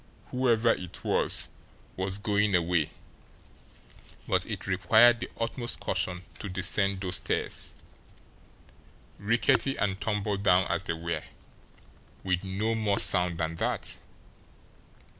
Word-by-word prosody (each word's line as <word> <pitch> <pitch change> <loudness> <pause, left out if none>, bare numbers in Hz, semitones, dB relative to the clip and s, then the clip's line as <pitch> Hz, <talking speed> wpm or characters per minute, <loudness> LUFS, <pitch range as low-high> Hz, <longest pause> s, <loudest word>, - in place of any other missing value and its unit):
Whoever 120 -3 +2
it 90 -4 -5
was - - +1 0.5
was 95 +1 -2
going 105 -1 +1
away 85 -2 +1 1.4
but - - +1
it - - -5
required 110 +6 +5
the - - -5
utmost 120 +1 -3
caution 90 0 -2 0.2
to 100 - -5
descend 95 +1 +2
those 90 -2 +1
stairs, - - -3 1.4
rickety 120 +6 +2
and 95 -1 -2
tumble 105 -1 -1
down 95 -2 +3
as 85 +3 +1
they - - -1
were, 85 -1 -3 1.0
with 95 -1 -1
no 100 +4 -1
more 110 -3 0
sound 90 -2 +4
than 80 0 -3
that! - - -2
100 Hz, 115 wpm, -28 LUFS, 90-110 Hz, 1.4 s, required